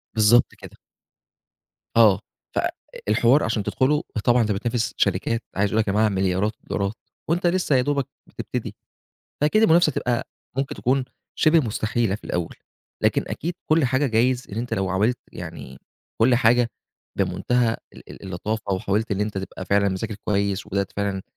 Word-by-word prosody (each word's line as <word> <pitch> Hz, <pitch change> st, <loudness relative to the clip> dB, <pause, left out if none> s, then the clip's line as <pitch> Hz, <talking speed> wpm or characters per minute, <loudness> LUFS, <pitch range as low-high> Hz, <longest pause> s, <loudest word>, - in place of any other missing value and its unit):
بالضبط 110 Hz, +3 st, +4 dB
كده. -, -, -13 dB, 1.2 s
آه، 110 Hz, -5 st, +6 dB, 0.4 s
فالحوار 120 Hz, +6 st, +1 dB
عشان 110 Hz, -2 st, 0 dB
تدخُله 145 Hz, +8 st, +1 dB, 0.2 s
طبعًا 120 Hz, 0 st, +5 dB
أنت 105 Hz, -1 st, +1 dB
بتنافس 115 Hz, +3 st, -1 dB
شركات، 115 Hz, 0 st, +1 dB
عايز 100 Hz, +1 st, +2 dB
أقول 110 Hz, -, +2 dB
لك 105 Hz, -, -2 dB
هي -, -, 0 dB
معاها 110 Hz, 0 st, +3 dB
مليارات 95 Hz, +2 st, +1 dB
الدولارات 100 Hz, +1 st, -2 dB, 0.4 s
وأنت 175 Hz, +1 st, +2 dB
لسّه 175 Hz, -5 st, +2 dB
يا 125 Hz, -, +4 dB
دوبك 140 Hz, 0 st, 0 dB, 0.2 s
بتبتدي. -, -, -5 dB, 0.7 s
فأكيد 215 Hz, +9 st, +3 dB
المنافسة 170 Hz, -5 st, +5 dB
هتبقى 120 Hz, -3 st, -1 dB, 0.3 s
ممكن 135 Hz, 0 st, -1 dB
تكون 130 Hz, +1 st, +1 dB, 0.3 s
شِبه 160 Hz, +1 st, +5 dB
مستحيلة 110 Hz, -3 st, -1 dB
في -, -, -8 dB
الأول، 85 Hz, -2 st, -3 dB, 0.5 s
لكن -, -, +2 dB
أكيد 170 Hz, +2 st, -4 dB
كل 155 Hz, -2 st, +4 dB
حاجة 130 Hz, +3 st, +2 dB
جايز 125 Hz, +2 st, +1 dB
إن -, -, -5 dB
أنت 120 Hz, +1 st, -2 dB
لو 95 Hz, -1 st, -1 dB
حاولت 105 Hz, +7 st, +1 dB
يعني 65 Hz, 0 st, -8 dB, 0.4 s
كل 120 Hz, +2 st, +5 dB
حاجة 120 Hz, 0 st, +4 dB, 0.5 s
بمنتهى 120 Hz, -2 st, +1 dB, 0.2 s
ال -, -, -14 dB
ال -, -, -11 dB
اللطافة 100 Hz, +3 st, -3 dB
وحاولت 100 Hz, +4 st, -1 dB
إن 100 Hz, 0 st, 0 dB
أنت 105 Hz, -2 st, -1 dB
تبقى 95 Hz, -1 st, -6 dB
فعلًا 100 Hz, 0 st, +2 dB
مذاكر 100 Hz, +3 st, -3 dB
كويس 100 Hz, -1 st, 0 dB
وبدأت 100 Hz, -1 st, -2 dB
فعلًا 100 Hz, -2 st, -1 dB
110 Hz, 155 wpm, -23 LUFS, 100-125 Hz, 1.2 s, آه